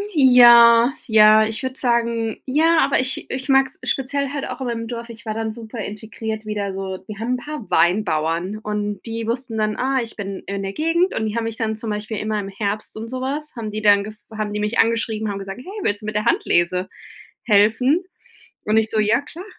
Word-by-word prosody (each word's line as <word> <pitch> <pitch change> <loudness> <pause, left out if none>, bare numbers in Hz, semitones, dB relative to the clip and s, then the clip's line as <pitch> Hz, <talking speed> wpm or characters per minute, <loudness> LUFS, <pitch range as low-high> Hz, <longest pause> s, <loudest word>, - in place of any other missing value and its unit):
ja, 240 -2 +7
ja, 215 -1 +6
ich 220 0 -4
würde 260 0 -4
sagen 235 -2 0
ja, 320 +5 +3
aber 275 -2 +3
ich 255 0 -3
ich 260 0 -5
mag 270 -1 +4
es 265 - -8
speziell 280 +1 -1
halt 285 0 -4
auch - - -6
in 260 - -2
meinem 230 -1 -3
Dorf. 235 0 -6
Ich 230 0 -12
war 215 - -2
dann 220 -1 -3
super 230 0 -10
integriert 220 +1 -5
wieder 205 -2 -3
so 190 -1 -5
wir 215 -2 -8
haben 235 +3 -1
'n 255 - 0
paar 295 -1 -8
Weinbauern 175 0 +1
und 210 -2 -4
die 225 -1 -4
wussten 235 -1 -3
dann, 215 0 0
ah, 265 0 0
ich 230 -1 -7
bin 195 -2 -6
in 200 0 -3
der 195 0 -4
Gegend. 330 - +1
Und 220 - -1
die 215 - -4
haben 230 - 0
mich 225 0 -4
dann 220 -1 -2
zum 220 0 -5
Beispiel 210 +1 -4
immer 215 +1 -2
im 195 -1 -5
Herbst 205 +2 -4
und 225 +1 -6
sowas 270 +4 -4
haben 225 -3 -5
die 215 +1 -4
dann 205 -1 +5
gef 215 +1 -8 0.2
haben 215 -1 -3
die 210 - -2
mich 210 +3 -1
angeschrieben, 225 -1 +1
haben 200 -1 -4
gesagt: 195 +4 -7
„Hey, 400 +7 -8
willst 205 0 -1
du - - -9
mit 215 - -4
der 210 - 0
Handlese 180 +2 +1 0.5
helfen?" 230 - +3 0.6
Und 215 +1 +2
ich 220 0 +2
so: 220 - 0
„Ja, 215 +5 +3
klar, 330 +5 -11
220 Hz, 225 wpm, -21 LUFS, 210-250 Hz, 0.6 s, ja